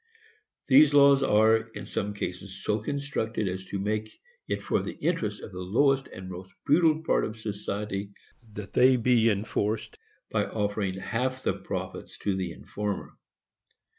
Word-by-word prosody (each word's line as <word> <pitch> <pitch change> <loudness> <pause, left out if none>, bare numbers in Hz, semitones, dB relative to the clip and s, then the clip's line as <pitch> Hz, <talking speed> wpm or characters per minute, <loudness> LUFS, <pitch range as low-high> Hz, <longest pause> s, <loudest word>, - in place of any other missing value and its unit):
These 145 +2 +6
laws 140 -1 +7
are, 110 -2 +5
in 110 0 -8
some 105 0 -3
cases, 95 0 -6
so 105 +1 +1
constructed 115 -4 -2
as 95 +1 -4
to 100 - -4
make 105 +2 -2 0.4
it - - -2
for - - +1
the - - -5
interest 110 -12 -1
of - - -8
the 90 0 -6
lowest 135 +8 +2
and 95 0 -9
most 95 +1 -8
brutal 160 +1 +4
part - - +2
of 110 - -4
society 105 -1 -4 0.4
that 100 -2 -8
they 130 +1 +6
be 115 -1 +4
enforced, 105 +1 -1 0.3
by - - +1
offering 100 -3 -1
half 130 +6 -2
the - - +1
profits - - -6
to 100 -2 -1
the 95 -2 -2
informer. 105 +4 -5
105 Hz, 155 wpm, -28 LUFS, 100-130 Hz, 0.4 s, laws